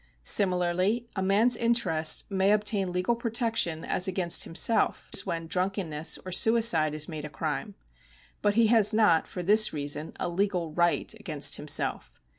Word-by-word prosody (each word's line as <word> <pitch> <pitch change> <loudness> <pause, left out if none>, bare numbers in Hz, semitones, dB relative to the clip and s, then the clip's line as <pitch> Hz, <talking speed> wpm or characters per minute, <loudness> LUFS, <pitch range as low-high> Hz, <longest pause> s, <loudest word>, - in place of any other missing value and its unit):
Similarly 185 - +2
a 190 - -3
man's 210 +6 +3
interests 195 -10 +1
may 195 0 +1
obtain 205 -3 -1
legal 180 +6 -1
protection 230 -8 -1
as 180 - 0
against 180 -2 0
himself, 220 +7 +1
as 195 - -2
when 165 -1 -4
drvmkenness 180 -4 -2
or 185 - -7
suicide 180 -7 +2
is 155 0 -4
made 155 -3 -7
a 150 - -7
crime. 140 - -5 0.7
But 205 -1 0
he 230 0 +4
has 215 -1 +3
not 210 -7 +3
for 180 - -7
this 215 +4 +4
reason 145 +1 -3
a - - -2
legal 180 -2 -2
right 175 +4 0
against 155 -10 -3
himself. 145 - -1
185 Hz, 155 wpm, -27 LUFS, 165-215 Hz, 0.7 s, he